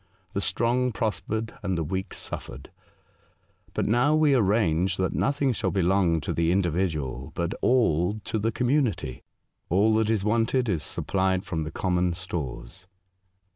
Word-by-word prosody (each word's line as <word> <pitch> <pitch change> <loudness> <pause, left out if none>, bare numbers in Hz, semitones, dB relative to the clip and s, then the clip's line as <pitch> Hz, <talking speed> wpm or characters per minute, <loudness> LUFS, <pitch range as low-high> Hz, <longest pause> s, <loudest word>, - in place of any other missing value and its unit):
The - - -1
strong 125 +2 +1
prospered, 110 +1 -2
and 95 -4 -1
the 80 - 0
weak 95 +5 -4
suffered. 65 - -7 1.0
But - - 0
now 125 +7 +3
we 155 -2 +4
arrange 95 -6 +2
that 95 0 0
nothing 140 -1 +1
shall - - -1
belong 90 -3 +2
to - - -3
the 85 0 +1
individual, 80 -8 -1
but 85 0 -1
all 105 -5 +2
to 110 - -2
the 110 +2 0
community. 125 - 0 0.5
All 100 +5 +3
that 110 -1 +1
is 110 -3 +1
wanted 115 +4 +1
is 85 -6 0
supplied 95 +5 -1
from 80 -5 -3
the 80 - -5
common 90 -1 0
stores." 85 -1 -6
95 Hz, 145 wpm, -26 LUFS, 85-115 Hz, 1.0 s, we